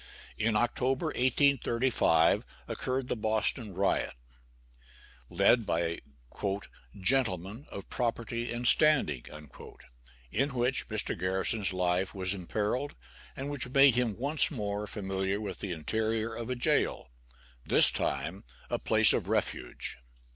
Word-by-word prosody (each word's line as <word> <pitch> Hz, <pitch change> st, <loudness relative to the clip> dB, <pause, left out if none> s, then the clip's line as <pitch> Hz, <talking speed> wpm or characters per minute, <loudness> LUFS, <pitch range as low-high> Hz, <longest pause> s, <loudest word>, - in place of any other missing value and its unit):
In 110 Hz, 0 st, +1 dB
October, 125 Hz, +5 st, 0 dB
1835, 125 Hz, -, +2 dB, 0.2 s
occurred 130 Hz, 0 st, -3 dB
the -, -, -2 dB
Boston 110 Hz, -1 st, 0 dB
riot, 95 Hz, -7 st, 0 dB, 1.1 s
led 100 Hz, +6 st, +3 dB
by 85 Hz, 0 st, -1 dB, 1.0 s
"gentlemen 105 Hz, -, +2 dB
of 100 Hz, -, -9 dB
property 115 Hz, 0 st, -3 dB
and 120 Hz, +1 st, -2 dB
standing," 150 Hz, -, +3 dB, 1.1 s
in 135 Hz, +2 st, 0 dB
which 125 Hz, +2 st, 0 dB
Mr. 110 Hz, -2 st, 0 dB
Garrison's 95 Hz, +3 st, -1 dB
life 90 Hz, +1 st, -1 dB
was 95 Hz, 0 st, 0 dB
imperilled, 105 Hz, +8 st, -3 dB, 0.4 s
and 140 Hz, +2 st, -5 dB
which 140 Hz, -3 st, -2 dB
made 135 Hz, 0 st, +6 dB
him 120 Hz, -4 st, 0 dB
once 140 Hz, +5 st, +2 dB
more 105 Hz, -6 st, -4 dB
familiar 95 Hz, -1 st, -3 dB
with 100 Hz, -3 st, -6 dB
the 100 Hz, -, -5 dB
interior 110 Hz, +7 st, -2 dB
of 115 Hz, +1 st, -6 dB
a 125 Hz, -, -1 dB
jail 120 Hz, -, 0 dB, 0.5 s
this -, -, +7 dB
time, -, -, -3 dB, 0.3 s
a -, -, -1 dB
place -, -, +6 dB
of -, -, -2 dB
refuge. -, -, -2 dB
110 Hz, 120 wpm, -29 LUFS, 95-125 Hz, 1.1 s, this